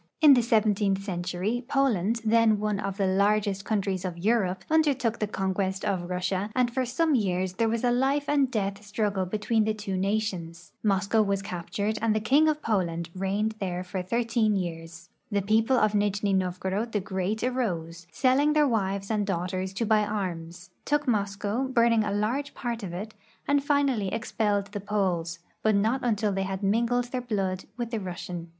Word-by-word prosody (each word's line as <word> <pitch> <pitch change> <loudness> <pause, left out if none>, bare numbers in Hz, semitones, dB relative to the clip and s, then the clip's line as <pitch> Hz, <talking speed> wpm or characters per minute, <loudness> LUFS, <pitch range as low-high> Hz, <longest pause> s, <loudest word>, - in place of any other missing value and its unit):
In 300 -3 +8
the 250 - +5
seventeentli 210 -4 +2
century 185 +5 -2
Poland, 230 -6 +1
then 220 -1 +4
one 210 -1 -1
of 195 -2 -3
the 200 - +1
largest 200 +1 +1
countries 195 -3 -1
of 180 -2 -4
Europe, 190 -1 +1
undertook 280 -8 +2
the 215 - 0
conquest 190 -1 -2
of 180 -3 -1
Russia, 185 +2 -1
and 245 -2 +2
for 260 0 0
some 305 +6 +1
years 185 -6 0
there 225 +4 +1
was 230 +1 -1
a 245 - +3
life 270 +3 +1
and 285 -2 +2
death 200 -4 -2
struggle 205 -2 -1
between 215 +3 +1
the 215 0 0
two 205 -2 -4
nations. 185 -4 -2
Moscow 200 +1 +2
was 200 -2 0
captured 200 +3 -3
and 220 -1 +2
the - - +2
king 280 +9 +4
of 305 0 -2
Poland 170 -6 -1
reigned 195 +3 -1
there 180 -2 -3
for 185 +1 -4
thirteen 225 +2 +1
years. 165 -2 -5 0.2
The 200 -3 0
people 225 +5 +3
of 215 -2 +3
Nijni 205 -1 +1
Novgorod 190 +4 -1
the 210 - +2
Great 190 +3 -2
arose, 180 -10 -2
selling 270 - +3
their 300 -1 +4
wives 195 -3 -1
and 210 -1 +1
daughters 185 0 -2
to 225 +4 -1
buy 215 0 +3
arms, 180 -4 -4
took 295 0 0
Moscow, 205 +2 0
burning 235 -3 +3
a 210 - -2
large 230 +8 -1
part 235 -2 -3
of 190 -4 -5
it, 205 +5 -6 0.3
and 285 -1 +2
finally 280 -8 +1
expelled 205 -3 -1
the 205 -1 -5
Poles, 185 -5 -1 0.2
but 220 -1 +3
not 220 +6 +2
until 215 -3 +1
they 195 0 -1
had 190 +1 -3
mingled 235 +4 +1
their 255 - -2
blood 195 -6 -2
with 240 -2 -4
the 225 - -1
Rus 180 -3 -6
sian. 175 -2 -6
205 Hz, 185 wpm, -27 LUFS, 190-230 Hz, 0.3 s, In